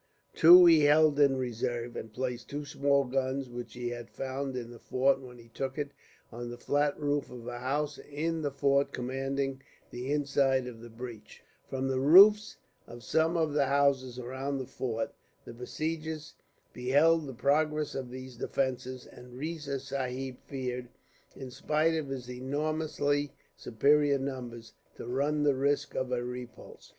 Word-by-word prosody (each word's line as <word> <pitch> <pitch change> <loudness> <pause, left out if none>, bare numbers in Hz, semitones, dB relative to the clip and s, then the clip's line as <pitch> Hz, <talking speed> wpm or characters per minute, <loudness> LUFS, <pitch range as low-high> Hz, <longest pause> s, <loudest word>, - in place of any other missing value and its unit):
Two 175 +2 +9
he 160 -3 +6
held 150 0 +5
in 140 -2 +5
reserve, 120 -1 -3
and 110 - -6
placed 125 0 -4
two 145 +1 -5
small 140 0 +2
guns, 130 0 -2
which 120 0 -7
he 120 -1 -3
had 120 -1 -7
found 135 0 -4
in 120 -1 -6
the 120 - -12
fort 135 +1 +1
when 125 -2 -11
he 115 -1 -16
took 135 +3 -4
it, 145 -1 -3 0.4
on 120 +1 -6
the 120 - -7
flat 145 +4 0
roof 145 -1 -1
of 120 -2 -10
a 120 0 -5
house 145 +4 -2
in 160 +3 -3
the 145 - 0
fort 140 0 +1
commanding 135 +1 -2 0.3
the 125 +3 -5
inside 140 -3 +2
of 120 -3 -9
the 120 - -10
breach. 115 -1 -10 0.3
From 135 0 -2
the 130 -1 0
roofs 200 +9 +7 0.3
of 120 0 -11
some 160 +8 +1
of 160 -3 +1
the 145 -2 +2
houses 135 -3 +2
around 130 +3 -4
the 130 - -4
fort 115 -2 -3 0.3
the - - -9
besiegers 155 +5 -4 0.4
beheld 145 +5 +3
the 135 - -6
progress 150 +3 +1
of 130 -2 -5
these 130 -1 -9
defences; 130 0 -2
and 125 0 -13
Riza 150 -2 -4
Sahib 130 -1 -4
feared, 125 -3 -4 0.5
in 130 -2 -8
spite 155 +5 +1
of 160 -3 -2
his 130 -3 -5
enormously 145 +2 -1 0.2
superior 140 +4 +3
numbers, 125 -4 -6 0.2
to - - -8
run 145 +5 0
the 145 -1 +4
risk 140 +2 0
of 130 -1 -2
a 125 -1 0
repulse. 125 0 -9
135 Hz, 165 wpm, -30 LUFS, 125-145 Hz, 0.5 s, Two